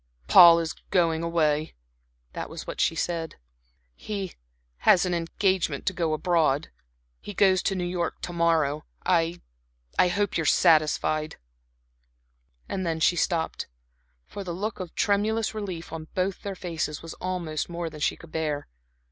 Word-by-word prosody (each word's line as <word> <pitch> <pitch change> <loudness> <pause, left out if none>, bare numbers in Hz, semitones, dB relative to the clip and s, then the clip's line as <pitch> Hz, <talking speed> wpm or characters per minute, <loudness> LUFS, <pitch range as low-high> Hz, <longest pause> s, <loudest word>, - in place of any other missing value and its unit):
"Paul 170 - +9
is 165 -1 -2 0.2
going 165 -3 +2
away." 155 -2 0 0.6
That - - -5
was - - -7
what - - -4
she 165 - +2
said. 165 -1 -2 0.6
"He 195 - -5 0.5
has 180 - +5
an 180 - -1
engagement 170 -2 0
to 190 - 0
go 165 -3 0
abroad. 160 -3 +1 0.5
He 205 - -9
goes 190 -2 +4
to 195 - 0
New 180 - -2
York 175 -1 -2
to 175 - -5
morrow. 160 -3 +1 0.2
I 170 -1 +1 0.6
I - - +6
hope 200 +2 0
you - - +1
are - - -3
satisfied." 155 0 +3 1.3
And 190 - -3
then 165 -2 -1
she 170 +2 +3
stopped, 165 -2 -1 0.6
for 200 - -7
the 175 -2 -5
look 205 +3 -4
of 180 -3 -7
tremulous 215 +2 +1
relief 185 -7 -6
on 160 -1 -6
both 185 0 -1
their 200 -1 -5
faces 165 -4 -4
was 165 - -7
almost 175 -5 -3
more 170 0 -4
than 155 -1 -8
she - - +1
could 165 - -14
bear. 150 -3 -2
170 Hz, 155 wpm, -26 LUFS, 160-185 Hz, 1.3 s, Paul